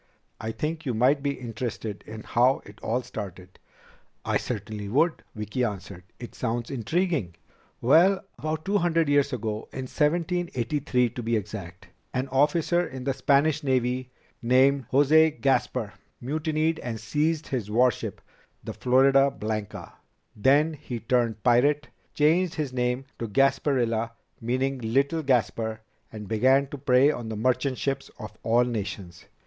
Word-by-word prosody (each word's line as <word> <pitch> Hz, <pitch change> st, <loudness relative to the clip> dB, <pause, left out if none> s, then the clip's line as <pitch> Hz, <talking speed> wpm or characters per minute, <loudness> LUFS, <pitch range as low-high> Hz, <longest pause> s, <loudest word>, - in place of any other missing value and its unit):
"I 110 Hz, -, -3 dB
think 155 Hz, +6 st, -3 dB
you 125 Hz, -5 st, -2 dB
might 130 Hz, +5 st, +3 dB
be 140 Hz, 0 st, -1 dB
interested 115 Hz, -3 st, -5 dB
in 110 Hz, 0 st, -8 dB
how 125 Hz, +3 st, +2 dB
it 100 Hz, -, -14 dB
all 125 Hz, +3 st, -1 dB
started." 95 Hz, -5 st, -8 dB, 0.7 s
"I -, -, +2 dB
certainly 105 Hz, -3 st, -5 dB
would," 160 Hz, -, +2 dB
Vicki 105 Hz, +4 st, -2 dB
answered. 95 Hz, -5 st, -5 dB
"It 120 Hz, -, -9 dB
sounds 120 Hz, -1 st, -3 dB
intriguing." 135 Hz, -, -1 dB, 0.5 s
"Well, 175 Hz, +10 st, +4 dB
about 155 Hz, +1 st, -3 dB
two 200 Hz, +1 st, +2 dB
hundred 165 Hz, -3 st, +1 dB
years 145 Hz, -1 st, +3 dB
ago, 110 Hz, -3 st, -4 dB
in 130 Hz, -, -5 dB
1783 150 Hz, -5 st, 0 dB
to 120 Hz, -, -6 dB
be 115 Hz, 0 st, 0 dB
exact, 100 Hz, -3 st, -6 dB, 0.3 s
an 130 Hz, +1 st, -1 dB
officer 155 Hz, +6 st, +2 dB
in 130 Hz, -6 st, -7 dB
the 135 Hz, +1 st, 0 dB
Spanish 145 Hz, +3 st, +2 dB
Navy 130 Hz, -2 st, 0 dB, 0.3 s
named 130 Hz, +1 st, +3 dB
José 155 Hz, +3 st, +4 dB
Gaspar 125 Hz, -5 st, 0 dB, 0.3 s
mutinied 155 Hz, +4 st, -1 dB
and 115 Hz, -2 st, -5 dB
seized 150 Hz, +8 st, -1 dB
his 120 Hz, -6 st, -3 dB
warship 125 Hz, +3 st, +1 dB, 0.4 s
the -, -, -5 dB
Florida 135 Hz, +2 st, +4 dB
Blanca. 110 Hz, -5 st, -5 dB, 0.4 s
Then 145 Hz, +8 st, +3 dB
he 130 Hz, -5 st, -6 dB
turned 115 Hz, -2 st, 0 dB
pirate, 140 Hz, +5 st, +3 dB, 0.3 s
changed 165 Hz, +4 st, +3 dB
his 150 Hz, -5 st, -3 dB
name 125 Hz, +1 st, -1 dB
to 115 Hz, -, -3 dB
Gasparilla, 120 Hz, -2 st, +1 dB, 0.3 s
meaning 130 Hz, +3 st, -1 dB
Little 135 Hz, +8 st, +1 dB
Gaspar, 115 Hz, -4 st, 0 dB, 0.3 s
and 105 Hz, -2 st, -8 dB
began 130 Hz, +6 st, +3 dB
to 145 Hz, -, -7 dB
prey 135 Hz, +1 st, +4 dB
on 120 Hz, -6 st, -6 dB
the 110 Hz, -, -4 dB
merchant 130 Hz, +3 st, 0 dB
ships 135 Hz, -1 st, -2 dB
of 110 Hz, -, -9 dB
all 115 Hz, +2 st, +3 dB
nations. 100 Hz, -7 st, -5 dB
130 Hz, 145 wpm, -26 LUFS, 115-145 Hz, 0.7 s, Well